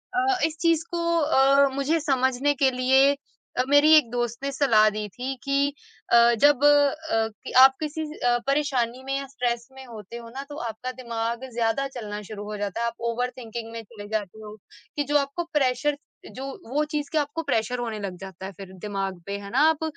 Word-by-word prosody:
अ, - - +3 0.3
इस 315 0 -3
चीज़ 330 -1 +2
को 345 - -2 0.2
अ, 280 -2 +4
मुझे 290 +4 +1
समझने 265 -1 +1
के 270 0 +3
लिए 265 +2 +4 0.5
अ, 250 - +3
मेरी 290 +2 +6
एक 270 -7 +3
दोस्त 240 -1 -2
ने 280 - -1
सलाह 225 -6 +4
दी 210 0 -4
थी 255 +5 -5
कि 280 0 +1 0.4
अ, 235 0 +7
जब 290 -1 +5
अ, 290 -5 +3 0.2
कि - - -7
आप 265 0 +7
किसी 310 +1 -4 0.2
अ, 245 0 +2
परेशानी 260 -3 0
में 270 +1 -2
या 275 - -4
स्ट्रेस 240 -2 -2
में 265 0 -12
होते 230 -1 -9
हो 230 -1 -10
ना 270 +3 -6
तो 290 - -7
आपका 245 +4 -6
दिमाग 235 0 -4
ज़्यादा 235 +4 0
चलना 210 -2 -5
शुरू 205 -1 -6
हो 210 0 -5
जाता 205 +2 -3
है, - - +1
आप 230 - -4 0.2
ओवरथिंकिंग 235 -2 -5
में 230 0 -6
चले 205 -1 -11
जाते 215 -1 -4
हो, 210 0 -9 0.4
कि 290 - 0
जो 290 +1 +2
आपको 280 +5 -1
प्रेशर 285 +1 +1 0.3
जो 265 +1 -7 0.3
वो 300 +1 +2
चीज़ 290 -1 -2
का 305 - +3
आपको 290 +3 -4
प्रेशर 245 -3 -1
होने 225 -3 -3
लग 190 -3 -5
जाता 190 0 -9
है 195 - -6
फिर 190 -1 -10
दिमाग 195 -3 -4
पे, 200 0 -4
है 200 0 -9
ना? - - +1
आप 320 0 -1
250 Hz, 205 wpm, -25 LUFS, 225-280 Hz, 0.5 s, अ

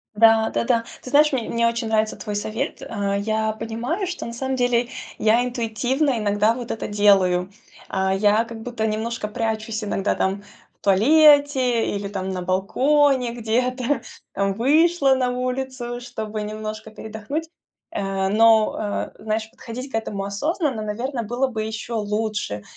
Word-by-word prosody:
Да-да-да, 225 +2 +4 0.2
ты - - -9
знаешь, 300 +3 +5
мне 250 -5 -2
мне 235 0 +2
очень 230 0 -1
нравится 220 -1 +1
твой 210 - -5
совет. 215 +2 -3
Э, 200 -3 -2
я 220 +1 0
понимаю, 230 - -3
что 360 0 -5
на 235 - -6
самом 265 +2 -2
деле 245 -1 +2 0.3
я 225 +3 +3
интуитивно 250 +3 0
иногда 210 +1 +2
вот 240 -1 -6
это 225 - -4
делаю, 195 -3 +3 0.4
а, 190 0 0
я 205 +3 +3
как 230 -1 -9
будто 235 -1 -3
немножко 220 +1 -2
прячусь 220 -1 -2
иногда, 205 -1 0
там 195 +1 -1 0.4
в - - -56
туалете 265 +2 +4
или 200 0 -3
там 190 -1 -4
на 185 -1 -3
балконе 255 +8 +2
где-то, 250 +4 0 0.3
там, 195 0 0
вышла 280 - +3
на 255 -1 +1
улицу, 250 -1 -3
чтобы 220 -3 -5
немножко 215 +1 -6
передохнуть. 220 +9 -5 0.4
Э, 195 -1 -1
но, 220 -1 +3
э, - - -16
знаешь, 220 0 -2
подходить 250 +4 -8
к - - -4
этому 210 -3 -2
осознанно, 265 - -1
наверно, 235 +4 -3
было 240 +5 0
бы 225 -4 -3
еще 220 +2 -5
лучше, 210 - -2
225 Hz, 150 wpm, -23 LUFS, 210-250 Hz, 0.4 s, знаешь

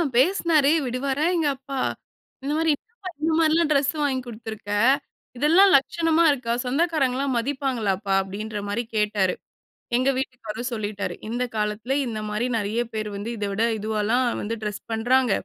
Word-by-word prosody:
பேசினாரு. 310 0 +4
விடுவாரா 265 +4 -1
எங்க 320 -3 +1
அப்பா! 275 0 -7 0.7
இந்த 280 - -2
மாரி 320 -1 +3
"என்னப்பா 440 - -11
இந்த 320 - +1
மாரிலாம் 325 0 +3
ட்ரெஸ் 280 -1 +3
வாங்கி 275 -3 +1
குடுத்துருக்க. 220 -3 -7 0.7
இதெல்லாம் 345 +8 +6
லட்சணமா 330 +4 +1
இருக்கா? 245 -4 -1
சொந்தக்காரங்கலாம் 275 -2 +1
மதிப்பாங்களாப்பா?" 230 -7 -1
அப்படின்ற 210 +3 -5
மாரி 205 +4 -1
கேட்டாரு. 205 -3 +2 0.6
எங்க 260 +2 +2
வீட்டுக்காரு 240 -4 -4
சொல்லிட்டாரு. 205 -2 -3
"இந்த 240 +2 -1
காலத்தில, 215 +4 -1
இந்த 225 -3 -4
மாரி 210 +3 -1
நெறைய 215 +2 -1
பேரு 215 -1 -3
வந்து, 205 +3 -5
இத 205 - -2
விட 215 +3 +1 0.2
இதுவால்லாம் 220 +4 +1 0.2
வந்து 230 +2 -3
டிரெஸ் 210 -2 -4
பண்றாங்க. 245 +2 +2
245 Hz, 140 wpm, -24 LUFS, 215-285 Hz, 0.7 s, இதெல்லாம்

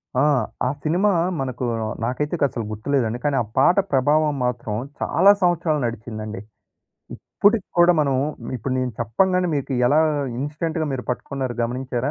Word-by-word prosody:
ఆ! 130 - +3 0.4
ఆ - - +1
సినిమా 180 +7 +2 0.3
మనకు 130 -1 -3 0.4
నాకైతేసలు 135 -2 -1
గుర్తులేదండి. 120 +1 -1
కానీ 145 -2 +1
ఆ - - -3
పాట 180 - +5
ప్రభావం 145 +3 +2
మాత్రం 120 -3 -2 0.3
చాలా 200 - +5
సంవత్సరాలు 170 -4 +2
నడిచిందండి. 110 -3 -5 0.7
ఇప్పుటికి 205 -1 +1
కూడా 175 +1 +7
మనం 140 -3 +1 0.4
ఇప్పుడు 130 +3 -4
నేను 125 -2 -1
చెప్పంగానే 180 - +1
మీకు 140 0 -3
ఎలా 145 +4 +4 0.4
ఇన్స్టెంట్‌గా 155 +2 -2
మీరు 125 -2 -3
పట్టుకున్నారు 130 0 -3
గమనించారా? 125 +2 -2
135 Hz, 130 wpm, -22 LUFS, 120-155 Hz, 0.7 s, కూడా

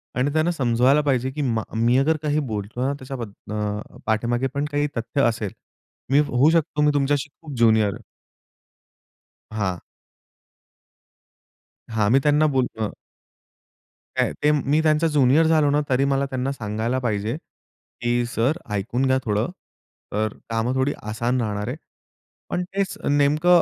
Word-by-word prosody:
आणि 130 +3 +1
त्यांना 160 +2 +2
समजवायला 130 0 +3
पाहिजे 130 -2 0
की 150 +2 -4
मा 115 -5 0
मी 120 +3 +3
अगर 155 +4 +3
काही 150 0 +1
बोलतो 105 +4 -4
ना 140 - +1
त्याच्याबद्द 125 -6 -6 0.2
अ, 105 0 -4
पाठीमागे 120 +4 0
पण 140 +1 -1
काही 145 0 +1
तथ्य 115 +5 -1
असेल. 110 -4 -3 0.6
मी 140 - +6
होऊ 135 +3 +3
शकतो 160 -2 +1
मी 150 0 +4
तुमच्याशी 145 +1 +1
खूप 150 -3 -8
ज्युनियर 110 -3 +4
आहे. - - -11 1.5
हां. 95 -4 -1 2.1
हां, 105 -2 +1
मी 135 - +6
त्यांना 150 +1 +4
बोल 130 -1 +3 0.2
अ 105 - +1 1.3
काय - - +1
ते 150 - +5
मी 150 +1 +2
त्यांचा 155 +1 +3
ज्युनियर 150 +1 +4
झालो 155 -2 +4
ना, 145 +1 +3
तरी 130 +1 +3
मला 140 0 +1
त्यांना 135 0 -2
सांगायला 115 +1 -2
पाहिजे, 110 0 -1 0.7
की 120 0 +1
"सर 125 +7 0 0.2
ऐकून 120 +6 -1
घ्या 130 0 +3
थोडं, 105 +1 0 0.7
तर 110 0 0 0.2
कामं 115 +2 0
थोडी 130 +2 +1
आसान 120 +4 -1
राहणार 105 -1 -2
आहे." 125 - -3 0.7
पण 180 - -1
तेच 195 +1 -3
नेमकं 150 +5 +4
130 Hz, 145 wpm, -23 LUFS, 115-145 Hz, 2.1 s, मी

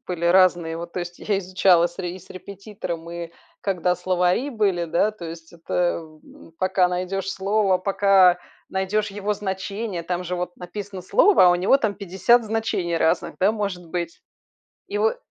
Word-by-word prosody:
были 175 -2 -4
разные 175 -2 +4
вот. 170 +1 -7
То 180 - -3
есть 175 0 -7
я 205 -2 -1
изучала 180 -2 +3
с 175 - -19
ре 175 -2 -4
и - - -9
с 185 - -19
репетитором, 185 -3 -7
и 170 -1 -6 0.3
когда 180 -2 0
словари 180 +7 +1
были, 200 -8 0
да. 170 +6 +1
То 210 -5 -11
есть 165 0 -9
это 175 +1 -1
в 155 -1 -15
м - - -16
пока 185 0 +2
найдешь 185 +2 -3
слово, 195 -1 +1
пока 190 -2 +4 0.3
найдешь 200 +2 -1
его 205 +1 -2
значение, 195 -1 -4
там 180 +1 -2
же 180 0 -3
вот 180 0 -4
написано 190 +1 -7
слово, 415 - +5
а - - +7
у 175 - +3
него 190 +9 +4
там 220 -6 -1
50 200 +5 +2
значений 210 -6 -1
разных, 160 0 0
да, 195 +3 +4
может 200 -5 -4
быть. 170 -1 -4 0.7
И 405 +2 -3
во 445 +3 +2
185 Hz, 180 wpm, -23 LUFS, 175-200 Hz, 0.7 s, а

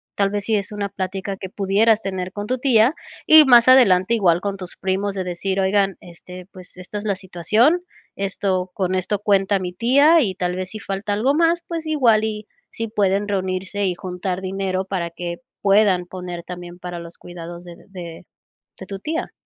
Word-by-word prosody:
Tal 200 -1 +2
vez, 205 0 -3
si 220 - +1
es 200 0 -4
una 205 -1 -3
plática 195 0 -4
que 190 - -7
pudieras 205 +3 +2
tener 185 -1 -4
con 205 0 -5
tu 255 - 0
tía, 245 0 +4 0.3
y 310 -1 +8
más 240 -3 +7
adelante 205 -6 +5
igual 180 -6 +3
con 200 0 -3
tus 185 -2 -9
primos, 195 +1 -2
de 190 - -2
decir: 185 +2 -3
"Oigan, 195 0 +1
este, 180 +1 -12
pues, 185 -1 -13
esta 185 +3 -7
es 205 - -9
la 200 -2 0
situación, 210 - +1 0.4
esto 190 -1 -1
con 185 -1 -1
esto 185 +2 -1
cuenta 200 -1 +2
mi 180 -1 -4
tía" 280 - +5
y 195 -8 -1
tal 180 -1 -2
vez, 185 0 -4
si 215 - -8
falta 200 +1 -3
algo 235 +7 +1
más, 335 +2 +2
pues, 330 -2 -5
igual 245 -8 +3
y 215 -1 -4 0.2
si 230 - -5
pueden 200 -1 +1
reunirse 190 0 -2
y 180 -2 0
juntar 180 +1 -4
dinero 190 0 -2
para 185 -3 -3
que 170 0 -6 0.2
puedan 195 -3 +3
poner 180 -1 -7
también, 175 0 -9
para 175 -1 -7
los 170 0 -10
cuidados 175 0 -9
de 175 -1 -10
de 175 -3 -9 0.5
de 190 - -8
tu 195 0 -6
tía. 320 - -4
195 Hz, 195 wpm, -21 LUFS, 180-210 Hz, 0.5 s, y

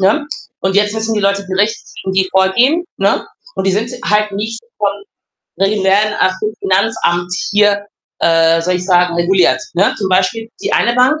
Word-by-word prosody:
ne, 215 +11 +2 0.3
und 190 0 -1
jetzt 205 +1 +2
müssen 220 0 -2
die 210 - 0
Leute 200 0 0
gerichtlich 200 +4 0 0.2
gegen 190 - -3
die 190 -1 +2
vorgehen, 240 - +2
ne? - - 0 0.3
Und - - -3
die 195 - +2
sind 220 +4 -1 0.2
halt 210 0 +2
nicht 220 +3 -4 0.2
von 205 -1 +1 0.7
die 195 +1 +1
werden 205 +2 +2
auch 185 - +3
vom 215 +2 -3
Finanzamt 185 -3 0 0.2
hier, 205 0 +2 0.4
äh, 165 0 +3
soll 180 +2 0
ich 180 - -5
sagen, 180 -2 +3
reguliert, 170 -6 +2
ne? 185 +3 +2
Zum 195 - -2
Beispiel 190 +5 0
die - - -2
eine 235 - +2
Bank 260 +5 +3
200 Hz, 180 wpm, -15 LUFS, 185-215 Hz, 0.7 s, auch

